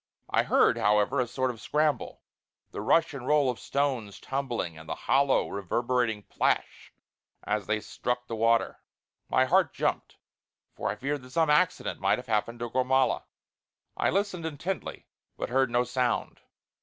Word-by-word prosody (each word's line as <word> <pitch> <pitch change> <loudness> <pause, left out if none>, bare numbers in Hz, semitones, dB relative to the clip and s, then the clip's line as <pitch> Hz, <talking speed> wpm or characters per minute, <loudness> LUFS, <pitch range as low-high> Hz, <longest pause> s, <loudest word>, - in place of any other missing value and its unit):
I - - +4
heard, - - +3
however, 105 +6 +2
a 125 - -1
sort 130 +1 -1
of 115 - -12
scramble; 150 0 0 0.5
the - - -5
rush 160 +9 +3
and 130 -2 -7
roll 145 -3 +4
of 120 - -9
stones 130 -8 -2
tumbling, 120 -11 -3
and 80 +1 -12
the - - -2
hollow 135 0 +3
reverberating 115 +2 -1
plash - - -1 0.5
as 105 -2 -2
they 110 0 +1
struck 125 +2 -3
the 115 - -5
water. 115 +1 +2 0.5
My 130 - +4
heart 180 +7 +2
jumped, - - -2 0.6
for - - -3
I - - -2
feared 140 +5 -3
that 125 - -13
some 160 +3 +2
accident 180 +5 +1
might 100 +1 +2
have 125 - -8
happened 115 +2 -1
to 120 - -3
Gormala. 130 +1 +2 0.7
I - - +1
listened 195 -2 -1
intently; 165 +5 -5 0.3
but - - -3
heard 130 0 +2
no 120 +1 +2
sound. 125 0 -1
125 Hz, 160 wpm, -28 LUFS, 115-140 Hz, 0.7 s, I